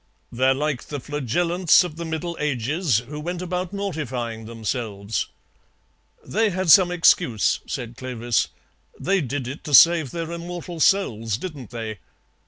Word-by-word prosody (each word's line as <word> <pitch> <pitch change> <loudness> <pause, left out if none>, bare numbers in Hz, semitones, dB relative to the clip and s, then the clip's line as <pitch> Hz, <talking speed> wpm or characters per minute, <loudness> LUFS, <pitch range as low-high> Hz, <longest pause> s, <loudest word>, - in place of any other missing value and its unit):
"They're 130 +2 +2
like 145 -2 -2
the 145 - -5
Flagellants 165 +8 +2
of 175 -4 -6
the 170 +1 -5
Middle 165 +2 -3
Ages, 145 - 0
who 150 +1 -6
went 175 +3 -4
about 180 0 -3
mortifying 130 - -4
themselves." 110 -2 -3 1.0
"They 220 +2 +1
had 185 -3 +1
some 185 0 +8
excuse," 165 - +3
said 120 -1 -5
Clovis. 120 -2 -1 0.5
"They 195 0 +1
did 135 -2 -3
it 135 +4 -7
to 145 - +4
save 165 -1 +7
their 165 +1 -5
immortal 170 0 -6
souls, 115 - +2
didn't 145 - -7
they? 110 -4 -6
150 Hz, 140 wpm, -23 LUFS, 120-175 Hz, 1.0 s, some